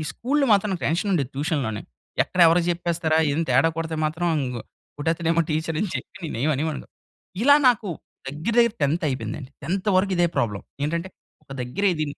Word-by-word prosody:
స్కూల్‌లో 275 +3 0
మాత్రం 200 0 +3
టెన్షన్ 170 +7 0
ఉండేది 140 -7 0
ట్యూషన్‌లోనే. 140 - -2 0.4
ఎక్కడ 180 - -3
ఎవరికి 170 +1 +4
చెప్పేస్తారా, 170 -2 0
ఏదైనా 160 +3 0
తేడా 135 +6 +4
కొడితే 160 -1 -3
మాత్రం 165 +3 0 0.7
కొట్టేతడామో 165 +2 +1
టీచర్ 160 +1 -1
అని 210 - 0
చెప్పి 190 0 -7
నేను - - -4
ఏమి 155 - +3
అనేవాళ్ళు. 155 +1 -3 0.6
ఇలా 285 +2 +7
నాకు 230 -4 +1 0.4
దగ్గర, 155 +11 -3
దగ్గర 235 -1 +3
10థ్ 155 +4 +1
అయిపోయిందండి. 130 +1 -4
10థ్ 185 +7 -2
వరకు 190 +1 +2
ఇదే 175 0 +4
ప్రాబ్లమ్. 105 -4 -1 0.2
ఏంటంటే, 170 +4 -2 0.3
ఒక 135 - -11
దగ్గర 125 +12 -3
ఇది 155 -1 -1
165 Hz, 165 wpm, -24 LUFS, 145-185 Hz, 0.7 s, ఇలా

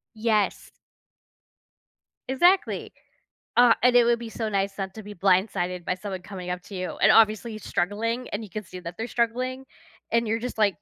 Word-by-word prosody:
Yes. 215 -2 0 1.6
Exactly. 350 +9 +2 0.6
Aw, 245 -1 +7
and 250 0 +5
it 245 - +7
would 235 0 +3
be 235 - -7
so 225 -1 -3
nice 195 -1 -1
not 190 0 -4
to 220 - -8
be 205 +1 -9
blindsided 180 -2 +1
by - - 0
someone 190 -1 -6
coming 185 -2 -7
up 180 0 -3
to 200 - -10
you, 185 0 -4
and - - +7
obviously, 220 +1 +4
he's 215 -3 -9
struggling, 225 +7 -1
and 210 +2 -4
you 205 - -10
can 215 +2 -5
see 185 -1 -10
that 175 -1 -8
they're 225 +2 -3
struggling, 255 +3 -1 0.5
and 230 0 +2
you're 225 +1 0
just, 245 -1 -5
like, 200 -2 +1
215 Hz, 190 wpm, -25 LUFS, 190-235 Hz, 1.6 s, Aw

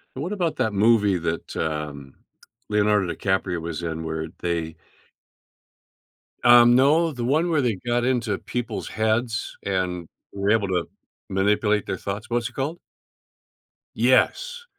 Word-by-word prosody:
And 135 - -4
what 185 +5 -3
about 175 -5 -1
that 110 -2 0
movie 105 -2 +3
that, 85 0 -4
um, 75 -3 -4 0.5
Leonardo 105 -3 +2
DiCaprio 95 -3 -1
was 85 0 -5
in 80 -1 -3
where 80 0 -3
they 85 -2 -2 1.7
Um, 120 0 +7
no, 155 +6 +4
the 125 -4 -5
one 155 +7 +1
where 155 -3 +2
they 120 -4 +1
got 120 0 +1
into 120 -5 0
people's 120 -3 -4
heads 110 +2 -1
and 90 -3 -2 0.3
were 100 0 -1
able 110 -3 +2
to 90 -2 -1 0.4
manipulate 105 +2 +1
their - - -3
thoughts. 100 +3 -5
What's 120 0 -1
it - - -21
called? 145 +7 -3 1.2
Yes. 485 -1 +2
105 Hz, 140 wpm, -24 LUFS, 90-120 Hz, 1.7 s, Um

